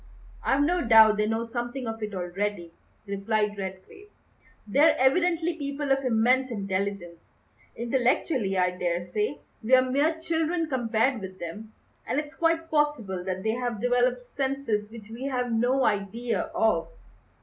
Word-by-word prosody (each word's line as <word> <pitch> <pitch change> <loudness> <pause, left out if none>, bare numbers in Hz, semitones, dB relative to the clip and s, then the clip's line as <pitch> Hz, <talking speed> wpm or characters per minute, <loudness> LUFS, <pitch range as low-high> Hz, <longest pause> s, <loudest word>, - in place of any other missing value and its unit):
"I've 275 +1 +2
no 350 +4 +1
doubt 220 -2 +7
they 210 0 +1
know 225 +1 -1
something 240 +2 -4
of 225 0 -5
it 210 -2 -4
already," 180 0 -3 0.3
replied 210 +1 -1
Redgrave; 190 - -8 0.6
"they're 285 +10 +4
evidently 340 +5 +2
people 280 -2 -3
of 270 0 +2
immense 255 +2 +2
intelligence. 195 -5 -3 0.6
Intellectually, 240 - 0
I 180 0 +2
daresay, 180 +8 -2 0.2
we're 255 +3 +5
mere 290 +5 +1
children 325 +1 0
compared 240 -2 0
with 190 -1 -8
them, 210 +6 -8 0.3
and 275 - 0
it's 300 0 -6
quite 330 0 0
possible 295 - 0
that 185 0 -4
they 220 - +1
have 240 -2 -3
developed 245 +1 +1
senses 265 -7 -2
which 220 -1 -12
we 240 +4 -6
have 250 -3 -1
no 245 +4 +2
idea 215 +4 -1
of." 195 -7 +2
235 Hz, 140 wpm, -27 LUFS, 205-270 Hz, 0.6 s, doubt